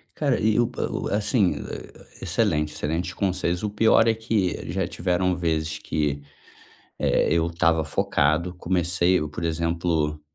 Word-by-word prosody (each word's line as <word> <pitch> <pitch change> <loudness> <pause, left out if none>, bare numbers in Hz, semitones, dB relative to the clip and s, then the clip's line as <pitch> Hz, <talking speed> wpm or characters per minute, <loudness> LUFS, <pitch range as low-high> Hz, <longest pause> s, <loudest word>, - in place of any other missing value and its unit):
Cara, 140 -4 +1
e 110 +1 +2
o 120 - +3
pa 125 - -4
o - - -3
assim, 105 - +2
eh, - - -10 0.2
excelente, 75 0 0
excelente 80 +4 -3
conselhos, 90 -2 -1
o 105 - 0
pior 110 +2 +4
é 115 - +4
que 110 -5 -1
já - - -1
tiveram 90 0 0
vezes 80 -2 -1
que, 75 -2 -2 0.8
eh, - - +2
eu 85 -1 +2
estava 85 -1 +1
focado 80 +6 +1
comecei, 90 0 +1
por 75 +3 -6
exemplo, 85 -2 -1
85 Hz, 145 wpm, -24 LUFS, 80-100 Hz, 0.8 s, pior